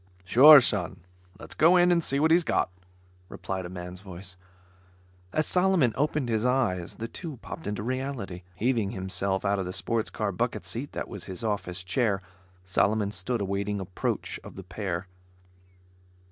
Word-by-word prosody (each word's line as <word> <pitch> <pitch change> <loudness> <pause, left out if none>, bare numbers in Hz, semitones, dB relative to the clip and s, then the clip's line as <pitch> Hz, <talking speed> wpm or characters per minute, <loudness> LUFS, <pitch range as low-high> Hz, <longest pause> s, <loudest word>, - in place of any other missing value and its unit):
"Sure, 140 +10 +10
Son, 95 -6 -1 0.4
let's - - -8
go 170 +4 +5
in 180 0 +5
and 170 -1 +3
see 140 -1 +1
what 160 +2 +3
he's 170 +1 +5
got," 150 - 0 0.6
replied 95 -2 -5
a - - -10
man's 90 0 -8
voice. 90 -1 -9 1.0
As 155 - +1
Solomon 180 - +3
opened 150 -1 0
his 110 -2 0
eyes, 120 -9 0
the 115 - -5
two 155 +2 -7
popped 160 - -7
into 105 0 -3
reality. 130 -7 -4
Heaving 115 0 0
himself 95 +1 -1
out 100 0 +1
of 95 - -2
the - - -3
sports 110 +4 -1
car - - -2
bucket - - -2
seat - - -5
that - - -4
was - - -7
his 95 +3 -6
office 100 -4 -2
chair, 100 +1 +1 0.5
Solomon 100 +2 +1
stood 105 +4 -2
awaiting 100 +1 -2
approach 95 -2 -3
of - - -11
the 95 - -8
pair. 90 -1 -4
105 Hz, 165 wpm, -27 LUFS, 95-130 Hz, 1.0 s, Sure